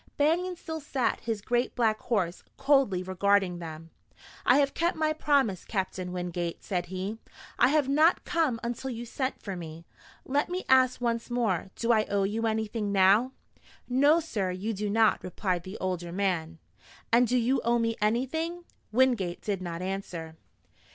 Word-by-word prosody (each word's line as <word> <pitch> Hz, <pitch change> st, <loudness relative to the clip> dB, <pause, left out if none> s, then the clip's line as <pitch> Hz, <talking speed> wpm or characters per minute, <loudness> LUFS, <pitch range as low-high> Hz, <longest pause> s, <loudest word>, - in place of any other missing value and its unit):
Banion 345 Hz, +5 st, +2 dB
still 320 Hz, -2 st, -6 dB
sat 270 Hz, -5 st, -1 dB
his 225 Hz, -3 st, -3 dB
great 240 Hz, +2 st, 0 dB
black 220 Hz, -3 st, +2 dB
horse, 185 Hz, -7 st, -1 dB
coldly 270 Hz, -10 st, +3 dB
regarding 190 Hz, -1 st, +1 dB
them. 165 Hz, -1 st, -8 dB, 0.6 s
"I 250 Hz, -, +7 dB
have 280 Hz, -1 st, +2 dB
kept 340 Hz, 0 st, 0 dB
my 310 Hz, -1 st, +1 dB
promise, 280 Hz, -, +1 dB
Captain 185 Hz, -2 st, -3 dB
Wingate," 175 Hz, -1 st, -4 dB
said 175 Hz, -2 st, -2 dB
he. 190 Hz, +4 st, -4 dB, 0.4 s
"I -, -, +6 dB
have 290 Hz, -1 st, +2 dB
not 310 Hz, +5 st, +3 dB
come 315 Hz, -9 st, +1 dB
until 240 Hz, +3 st, -3 dB
you 240 Hz, -1 st, -5 dB
sent 260 Hz, +3 st, -3 dB
for 195 Hz, -2 st, -4 dB
me. 165 Hz, -1 st, -8 dB, 0.4 s
Let 285 Hz, +5 st, 0 dB
me 365 Hz, +1 st, -3 dB
ask 260 Hz, -1 st, +4 dB
once 235 Hz, -1 st, -1 dB
more, 220 Hz, -7 st, 0 dB
do 235 Hz, 0 st, +1 dB
I 215 Hz, -2 st, +3 dB
owe 200 Hz, -1 st, 0 dB
you 220 Hz, +3 st, 0 dB
anything 220 Hz, -1 st, -1 dB
now?" 200 Hz, +6 st, +4 dB, 0.5 s
"No, 285 Hz, +6 st, +4 dB
sir, 220 Hz, -, -2 dB
you 190 Hz, +5 st, -3 dB
do 205 Hz, +1 st, -3 dB
not," 220 Hz, +1 st, +3 dB
replied 185 Hz, -1 st, -2 dB
the 185 Hz, +4 st, -8 dB
older 180 Hz, -2 st, -3 dB
man. 175 Hz, -4 st, -1 dB, 0.6 s
"And 240 Hz, +1 st, +6 dB
do 250 Hz, -, +2 dB
you 250 Hz, +3 st, +2 dB
owe 235 Hz, +1 st, +2 dB
me 230 Hz, -1 st, 0 dB
anything?" 320 Hz, +11 st, -1 dB, 0.3 s
Wingate 225 Hz, -7 st, +2 dB
did 200 Hz, -3 st, -2 dB
not 175 Hz, -1 st, -5 dB
answer. 180 Hz, -4 st, -5 dB
220 Hz, 165 wpm, -28 LUFS, 185-260 Hz, 0.6 s, I